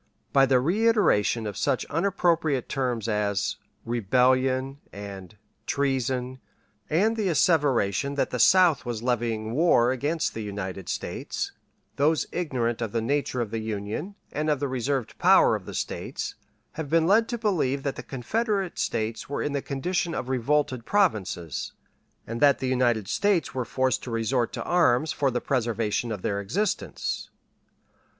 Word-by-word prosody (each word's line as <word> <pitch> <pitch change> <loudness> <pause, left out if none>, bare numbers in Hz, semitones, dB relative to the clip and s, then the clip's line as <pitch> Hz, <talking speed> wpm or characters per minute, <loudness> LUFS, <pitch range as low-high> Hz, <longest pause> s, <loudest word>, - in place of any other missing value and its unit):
By 135 -1 +5
the 130 -1 +4
reiteration 175 - +2
of 105 -2 -4
such - - 0
unappropriate 165 -5 +1
terms 125 -5 -2
as 105 -2 0 0.3
"rebellion" 130 +4 +1
and 100 0 -9 0.3
"treason," 130 -2 -1 0.5
and 210 +8 +2
the 215 -3 -1
asseveration 140 - +2
that 140 - 0
the 125 - -2
South 175 0 +5
was 120 -3 -4
levying 115 -3 -1
war 125 -4 +4
against 145 +5 -1
the 110 - -5
United 95 -3 -5
States, - - -4 0.5
those 150 +2 +2
ignorant 125 -9 -1
of 115 -3 -3
the 115 - +1
nature 135 0 -1
of 110 -3 -3
the 115 - -2
Union, 110 - -4 0.2
and 155 +1 -1
of 150 -3 +1
the 140 - -1
reserved 130 -1 -2
powers - - +5
of - - -19
the - - -6
States, - - -4 0.4
have 160 -3 -6
been 165 +1 +3
led 220 +6 +4
to 240 - -2
believe 155 - 0
that 140 - -2
the - - -6
Confederate 195 - -2
States 110 +2 -2
were 140 - -2
in 145 - -1
the 140 - -1
condition 165 +5 -2
of 125 - -4
revolted 130 0 0
provinces, 105 - 0 0.5
and 115 +1 -5
that 140 -2 +6
the 130 - -3
United 120 -5 +1
States 190 - +1
were 125 -2 -2
forced 130 +1 0
to - - -7
resort 115 +1 0
to - - -4
arms 155 -4 +3
for 140 - +1
the 125 -1 -1
preservation 115 -2 -1
of 105 -4 -5
their 100 0 -1
existence. 190 - -2
130 Hz, 155 wpm, -26 LUFS, 115-155 Hz, 0.5 s, that